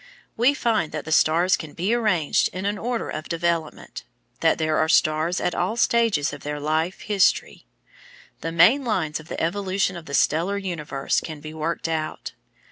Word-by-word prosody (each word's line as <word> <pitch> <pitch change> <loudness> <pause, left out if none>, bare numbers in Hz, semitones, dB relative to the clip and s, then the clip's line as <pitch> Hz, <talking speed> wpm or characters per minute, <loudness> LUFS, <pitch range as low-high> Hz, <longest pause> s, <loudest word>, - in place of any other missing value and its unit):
We 250 +5 +3
find 220 - 0
that 155 - -4
the 160 - -6
stars 165 +4 +4
can 155 -3 -9
be 190 +7 -1
arranged 210 -10 +2
in 185 +1 -5
an 205 0 -1
order 240 0 -2
of 155 0 -6
development 170 -2 -2 0.4
that - - +3
there 155 -1 0
are 155 - +1
stars 155 +2 +2
at 180 - -1
all 190 +6 -1
stages 230 -12 +2
of 145 - -8
their 150 0 -4
life 155 +4 -1
history. 205 -3 +1 0.7
The 165 - -4
main 180 +13 +5
lines 160 - -1
of 160 - -13
the - - -5
evolution 190 +2 -1
of 170 -2 -9
the 140 - -2
stellar 170 +9 +1
universe 160 -8 -2
can 155 -2 -7
be 155 +1 -9
worked 160 +1 -3
out. 160 -1 -3
170 Hz, 180 wpm, -23 LUFS, 155-200 Hz, 0.7 s, main